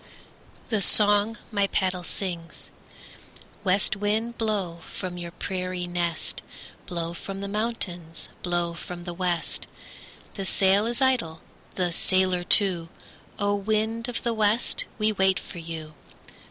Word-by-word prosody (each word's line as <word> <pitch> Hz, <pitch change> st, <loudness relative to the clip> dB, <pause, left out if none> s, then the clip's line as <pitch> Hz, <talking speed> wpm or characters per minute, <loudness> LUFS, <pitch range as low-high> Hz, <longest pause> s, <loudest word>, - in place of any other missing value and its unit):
THE 220 Hz, -4 st, +1 dB
SONG 205 Hz, +3 st, +6 dB
MY 200 Hz, -2 st, +2 dB
PADDLE 185 Hz, -2 st, 0 dB
SINGS 170 Hz, -4 st, -2 dB, 0.9 s
West 195 Hz, 0 st, +4 dB
wind, 215 Hz, +4 st, 0 dB
blow 200 Hz, -7 st, -1 dB
from 185 Hz, -2 st, -5 dB
your 175 Hz, -1 st, -5 dB
prairie 185 Hz, 0 st, -3 dB
nest, 175 Hz, -2 st, -2 dB, 0.5 s
Blow 170 Hz, -1 st, -3 dB
from 195 Hz, +3 st, -6 dB
the 200 Hz, -, -4 dB
mountains, 195 Hz, -6 st, -2 dB
blow 175 Hz, -1 st, 0 dB
from 175 Hz, +1 st, -7 dB
the 175 Hz, 0 st, -4 dB
west. 175 Hz, -1 st, -2 dB, 0.7 s
The 195 Hz, -, -4 dB
sail 195 Hz, +3 st, +4 dB
is 240 Hz, +3 st, +1 dB
idle, 235 Hz, -12 st, +1 dB, 0.3 s
the 180 Hz, -2 st, +1 dB
sailor 185 Hz, 0 st, +2 dB
too; 175 Hz, -3 st, +3 dB, 0.5 s
O! 205 Hz, 0 st, +1 dB
wind 220 Hz, +3 st, 0 dB
of 245 Hz, -, -4 dB
the 235 Hz, -, +1 dB
west, 220 Hz, +2 st, +2 dB
we 215 Hz, -1 st, +3 dB
wait 190 Hz, -2 st, +3 dB
for 175 Hz, -, -9 dB
you. 160 Hz, -2 st, -6 dB
190 Hz, 130 wpm, -26 LUFS, 175-210 Hz, 0.9 s, SONG